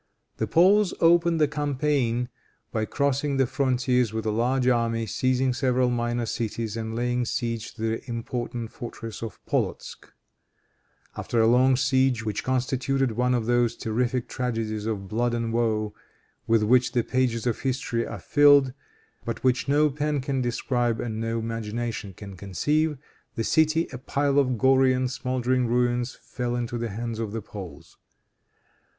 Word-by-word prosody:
The - - -1
Poles 195 +4 +4
opened 170 0 +4
the 150 - +4
campaign 140 -4 0 0.4
by 110 -1 -1
crossing 140 +2 0
the 135 - +4
frontiers 125 -2 +1
with 110 0 -4
a 110 - +1
large 125 +4 +1
army, 115 -2 +1
seizing 130 +4 +1
several 125 0 +1
minor 120 0 -1
cities 115 -1 -3
and 110 0 -4
laying 120 +1 0
siege 115 -1 -3
to 115 - -10
the 115 +3 -2
important 120 0 -4
fortress 115 -3 -8
of 115 -2 -6
Polotzk. - - -3 1.0
After 120 - -2
a 110 - +5
long 130 +3 +5
siege, 130 -3 +2
which 105 -2 -2
constituted 130 0 0
one 125 +3 +1
of 115 -2 -1
those 120 0 +2
terrific 120 +2 -1
tragedies 115 -4 -3
of 100 -3 -3
blood 120 +3 0
and 115 -1 -2
woe 110 -3 0 0.5
with 115 -1 +3
which 125 +3 +3
the 120 -2 +2
pages 125 -3 0
of 120 - 0
history 130 -3 -1
are - - -6
filled, 145 -3 +5 0.5
but 115 - -5
which 130 +1 +2
no 145 +2 +3
pen 150 +1 -1
can 135 0 -1
describe 120 -1 0
and 110 -2 -3
no 115 0 -1
imagination 115 -2 -4
can 100 0 -9
conceive, 150 - 0 0.4
the 115 - -1
city, 160 +5 +2
a 125 - -6
pile 140 +2 +1
of 130 -3 +1
gory 130 +2 +4
and 130 0 -1
smouldering 125 -1 0
ruins, 120 +1 0
fell 120 -1 -3
into 120 0 -3
the 115 0 -2
hands 115 +2 -4
of 110 -2 -3
the 115 - -3
Poles. 95 -4 -10
120 Hz, 155 wpm, -25 LUFS, 115-130 Hz, 1.0 s, a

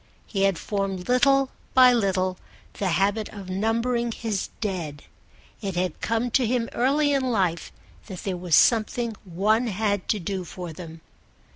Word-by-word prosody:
He 195 -2 0
had 195 -3 +2
formed 195 -2 -3
little 270 +2 +3 0.2
by 255 -1 +8
little 185 -5 0 0.3
the 200 - -2
habit 200 +5 +1
of 195 -3 -8
numbering 230 +4 0
his 220 -3 -3
Dead: 170 -9 -4 0.6
it 195 -4 -3
had 180 -2 -2
come 230 +2 0
to 250 0 +2
him 235 0 0
early 285 +4 +2
in 265 -2 +1
life 185 -7 0 0.4
that 190 -5 -8
there 190 -2 -2
was 175 -2 +1
something 230 0 +3
one 210 +7 +1
had 205 -2 -1
to 215 - +2
do 190 0 -3
for 175 -1 -7
them. 165 -1 -10
205 Hz, 155 wpm, -25 LUFS, 185-235 Hz, 0.6 s, by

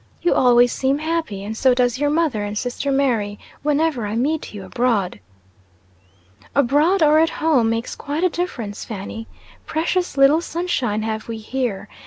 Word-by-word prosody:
"You 345 - +3
always 245 -1 +4
seem 270 +1 +1
happy, 315 -10 -3
and 215 +2 -5
so 255 +2 +3
does 245 0 +1
your 290 0 +2
mother 300 -9 +1
and 205 +1 -4
sister 250 +4 -2
Mary, 235 -7 0 0.2
whenever 295 -5 0
I 210 - -3
meet 290 +7 -1
you 200 -2 -8
abroad." 205 - 0 1.4
"Abroad, 295 +7 +3
or 305 +1 +5
at 325 +1 +4
home, 295 -9 +2
makes 230 +1 -2
quite 295 +4 -3
a 365 - +4
difference, 250 - -4
Fanny. 220 +2 -7 0.4
Precious 340 0 -1
little 275 +4 +5
sunshine 265 -12 -2
have 220 0 -3
we 230 -1 -4
here. 225 -2 -3
255 Hz, 160 wpm, -21 LUFS, 220-310 Hz, 1.4 s, or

